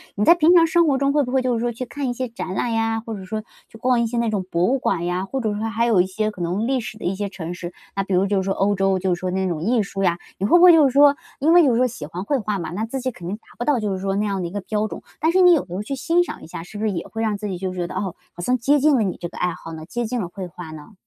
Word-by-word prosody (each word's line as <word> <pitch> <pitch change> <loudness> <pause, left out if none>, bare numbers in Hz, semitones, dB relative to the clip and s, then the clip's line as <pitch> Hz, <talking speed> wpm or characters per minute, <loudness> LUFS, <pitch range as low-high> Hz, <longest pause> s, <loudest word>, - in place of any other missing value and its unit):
你 205 - 0
在 335 - +9
平 345 +1 +5
常 335 -1 +7
生 335 0 +3
活 275 -3 +3
中 275 +1 +2
会 295 - +3
不 250 - -5
会 265 - +3
就 255 -1 0
是 230 - 0
说 240 +1 -1
去 235 - -5
看 265 +2 -4
一 - - -1
些 255 +1 -3
展 230 -5 -5
览 240 - -1
呀？ 225 0 0
或 225 - -5
者 195 - -8
说， 215 +2 -4 0.3
去 225 - -13
逛 245 +1 +2
一 235 - +1
些 240 +2 -3
那 235 -1 +1
种 205 -3 -1
博 170 0 0
物 265 +5 +2
馆 175 -7 -1
呀？ 180 +2 -1
或 265 +7 -3
者 215 -3 -1
说 210 +1 -4
还 230 +1 0
有 225 -5 +3
一 180 - 0
些 215 +3 -2
可 185 - -9
能 180 +6 -1
历 265 0 +1
史 215 -2 -7
的 - - -11
一 180 - +1
些 205 +1 -3
城 175 -3 -6
市， 175 0 -7 0.2
那 195 - 0
比 195 - -3
如 185 +2 +3
就 200 0 0
是 190 - +1
说 195 +1 0
欧 200 +2 +1
洲 195 0 +2
就 185 -1 +1
是 175 - -4
说 185 - -2
那 190 +1 0
种 160 -3 -3
艺 225 +2 +2
术 195 0 -5
呀？ 175 -2 +2 0.2
你 195 - 0
会 280 - +6
不 350 - +5
会 360 - +10
就 315 -4 +6
是 - - -7
说 285 0 +6 0.2
因 300 +4 +3
为 350 - +8
就 265 - +4
是 - - +2
说 250 - +4
喜 220 -11 -7
欢 170 +4 -6
绘 275 +6 0
画 210 -2 -2
嘛， 170 -4 -5
那 205 +6 -2
自 265 +4 -4
己 255 0 -2
肯 175 -7 -10
定 190 - -2
达 - - -35 0.2
不 240 - -2
到 285 -3 +2
就 210 -2 -1
是 190 - -3
说 195 0 -1
那 205 +1 0
样 195 -2 -1
的 175 - -2
一 - - -9
个 205 +1 -4
标 210 +2 -1
准， - - -8 0.2
但 320 - +2
是 375 +2 +4
你 360 -1 +8
有 315 - +1
时 175 - -10
候 195 +3 -3
去 245 - -5
欣 335 +6 +2
赏 - - -8
一 - - -10
下， 165 - -7
是 195 +4 -10
不 210 - -4
是 215 - +1
也 170 -3 -4
会 225 - -5
让 215 -2 0
自 210 +1 -5
己 190 -3 -4
就 185 +1 -3
是 185 - -6
觉 175 - -1
得， - - -8
哦， 190 -2 -3 0.2
好 175 - -8
像 250 +8 +1
接 280 +5 +3
近 295 +1 +4
了 245 - +2
你 190 -3 -2
这 175 - -4
个 - - -12
爱 180 -1 0
好 165 - -9
呢？ 160 0 -8
接 240 +7 -3
近 240 +1 -2
了 180 - -3
绘 185 0 -7
画 175 -2 -9
呢？ 155 +6 -11
215 Hz, 400 characters per minute, -22 LUFS, 185-250 Hz, 0.3 s, 会